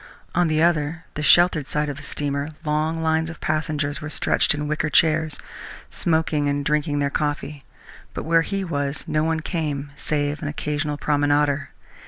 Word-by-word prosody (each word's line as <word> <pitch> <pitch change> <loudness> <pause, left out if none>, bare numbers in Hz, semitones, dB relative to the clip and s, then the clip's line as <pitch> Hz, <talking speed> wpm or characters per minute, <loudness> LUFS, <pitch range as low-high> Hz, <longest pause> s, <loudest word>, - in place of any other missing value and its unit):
On 175 0 +3
the 155 0 +2
other, 165 -1 +1
the 150 - -4
sheltered 170 -2 +5
side 150 0 0
of 145 -2 -4
the - - -9
steamer, 140 0 -3 0.2
long 155 +2 0
lines 160 0 +1
of 165 - -9
passengers 155 -1 -1
were 150 - -5
stretched 150 - +2
in 150 0 -3
wicker 150 0 0
chairs, 155 0 +3 0.5
smoking 160 -3 +1
and 140 0 -1
drinking 150 0 +1
their 140 -1 0
coffee, 145 -1 -2 0.5
but - - -3
where 165 +1 +4
he 195 +4 -2
was 145 -5 -2
no 155 0 0
one 160 0 0
came 145 -4 -3
save 145 0 -1
an 155 - -3
occasional 150 0 -2
promenader. 145 -1 +1
150 Hz, 170 wpm, -23 LUFS, 145-160 Hz, 0.5 s, sheltered